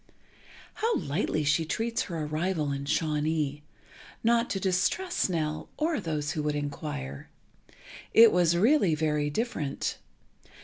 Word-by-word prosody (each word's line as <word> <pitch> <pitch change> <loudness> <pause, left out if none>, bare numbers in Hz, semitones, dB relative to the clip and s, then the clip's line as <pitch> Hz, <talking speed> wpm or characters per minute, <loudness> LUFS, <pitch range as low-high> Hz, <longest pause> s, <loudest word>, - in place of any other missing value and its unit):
How 455 +1 +2
lightly 155 +1 -1
she 150 +3 +2
treats 225 +8 -1
her 165 -4 -4
arrival 155 0 -1
in 140 0 -3
Shawnee—not 155 - -1
to 195 - -1
distress 195 - 0
Nell, 155 -3 -2
or 315 -1 0
those 155 -5 -2
who 155 - -2
would 150 0 -1
inquire. 145 - -5 0.8
It 230 0 +8
was 170 -1 +3
really 205 - +4
very 150 -1 0
different. 150 - -2
160 Hz, 120 wpm, -28 LUFS, 150-200 Hz, 0.8 s, It